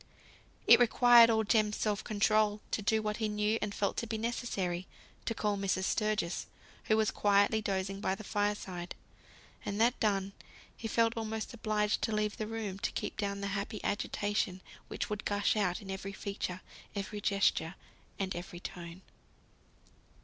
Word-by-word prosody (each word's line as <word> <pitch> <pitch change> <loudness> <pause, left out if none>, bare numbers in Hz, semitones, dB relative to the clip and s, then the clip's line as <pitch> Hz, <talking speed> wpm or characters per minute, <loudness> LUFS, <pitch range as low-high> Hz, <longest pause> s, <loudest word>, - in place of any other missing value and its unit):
It - - +9
required 240 0 +7
all 220 -1 +3
Jem's 210 -1 +2
self 210 -1 -1
control 215 -1 +2
to - - 0
do 220 +1 +1
what 210 0 -1
he 220 -2 -1
knew 210 +1 +1
and 210 - -1
felt 200 0 -1
to 230 - -2
be 220 - -2
necessary, 195 -6 -2 0.4
to 230 - -1
call 210 -1 0
Mrs. 190 -1 0
Sturgis, 215 -4 0 0.4
who 215 - +3
was 220 -1 +2
quietly 205 +2 +3
dozing 195 -1 -2
by 190 - 0
the 215 - -9
fireside; 205 -4 -2 0.7
and 205 +1 -3
that 235 +2 +3
done, 200 -2 +1 0.4
he 225 - -5
felt 230 +1 +2
almost 220 +1 -4
obliged 215 -2 0
to 220 - 0
leave 210 -1 0
the 215 - -3
room 215 -4 -4
to - - -1
keep - - -3
down 200 -1 -2
the 200 - -2
happy 205 +1 -3
agitation 205 -2 -1 0.3
which - - -3
would 210 0 -4
gush 205 +1 +1
out 195 -2 0
in 195 - -6
every 195 +1 -5
feature, 190 -2 -4 0.3
every 205 +1 -4
gesture, 195 -4 +1 0.4
and 190 -2 -2
every 175 0 -7
tone. 175 0 -8
210 Hz, 165 wpm, -32 LUFS, 195-220 Hz, 0.7 s, It